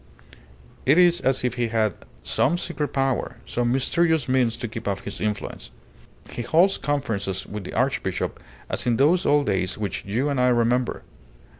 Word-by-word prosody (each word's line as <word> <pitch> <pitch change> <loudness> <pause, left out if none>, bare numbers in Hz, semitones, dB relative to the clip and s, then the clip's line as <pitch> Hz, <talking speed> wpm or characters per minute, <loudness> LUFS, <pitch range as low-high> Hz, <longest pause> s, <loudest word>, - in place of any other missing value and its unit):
It 145 +5 +5
is 175 -1 +5
as 130 -1 +1
if 125 -2 0
he 120 - +2
had 110 -3 +1 0.3
some 150 - +1
secret 155 -4 -2
power; 135 -2 -1
some 120 0 -1
mysterious 160 +3 +2
means 130 -3 +2
to 120 - -4
keep 110 - -7
up 100 -1 -1
his 100 - -7
influence. 105 -1 -3 0.6
He - - -4
holds 175 +10 +3
conferences 110 -10 -2
with 105 -2 -7
the - - -7
Archbishop, - - -1 0.3
as - - -3
in 120 -2 +2
those 160 +6 +3
old 145 0 +4
days 95 -1 0
which 105 -2 -3
you 120 +9 -1
and 140 -2 -1
I 125 - +4
remember. 120 0 +1
125 Hz, 170 wpm, -24 LUFS, 110-145 Hz, 0.6 s, It